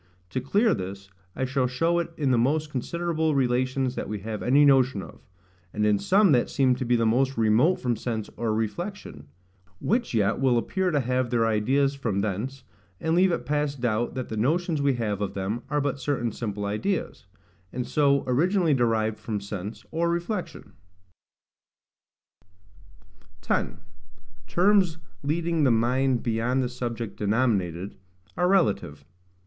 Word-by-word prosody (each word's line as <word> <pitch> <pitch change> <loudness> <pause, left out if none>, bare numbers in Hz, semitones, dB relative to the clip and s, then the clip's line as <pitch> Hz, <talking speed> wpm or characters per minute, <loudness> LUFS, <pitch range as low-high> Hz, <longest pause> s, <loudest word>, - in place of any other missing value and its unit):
To 130 - -2
clear 205 - +2
this, 95 +1 -6 0.2
I 130 - -1
shall 130 0 0
show 165 +7 +1
it 170 - -2
in 140 -4 +1
the 125 - +3
most 150 +5 +1
considerable 160 +3 -1
relations 130 0 +1
that - - -5
we 105 -2 -4
have 110 +1 -5
any 140 +4 +4
notion 130 -7 +3
of; - - -14 0.5
and 105 0 0
in 105 -1 +3
some 195 - +4
that 125 -3 +3
seem 130 -2 +3
to 130 - -3
be 120 +1 +2
the 115 -1 +2
most 130 +4 +1
remote 115 +11 +4
from 120 -2 -1
sense 110 -1 -4
or 115 -2 -1
reflection: 110 - -4 0.5
which 235 - 0
yet 105 0 +2
will 130 -3 +3
appear 185 +10 0
to 150 -5 +1
have 125 0 0
their 115 -2 +2
ideas 130 +6 +2
from 115 -8 -2
thence, 110 +7 -3 0.4
and 160 - -1
leave 185 +1 +4
it 170 - -2
past 145 -2 -1
doubt 120 -1 0
that 130 -1 -4
the 110 - -4
notions 155 +6 +1
we 140 -2 +2
have 105 -4 -2
of 100 -1 -3
them 100 +5 -2
are 150 0 +1
but 140 -1 -1
certain 130 -4 -1
simple 105 -2 -4
ideas, 105 - -3 0.4
and 125 0 -3
so 140 -2 +2
originally 165 +6 +2
derived 110 -4 +1
from 105 -3 -3
sense 100 +1 -7
or 170 +1 0
reflection. 175 +3 -4 2.7
10. - - -1 0.7
Terms 180 - +3 0.2
leading 165 +2 0
the 135 - +4
Mind 125 +2 +2
beyond 120 +3 0
the 125 - -2
Subject 120 -4 -5
denominated, 100 -5 0 0.4
are 180 - +2
relative. 100 - +1
125 Hz, 160 wpm, -26 LUFS, 110-150 Hz, 2.7 s, any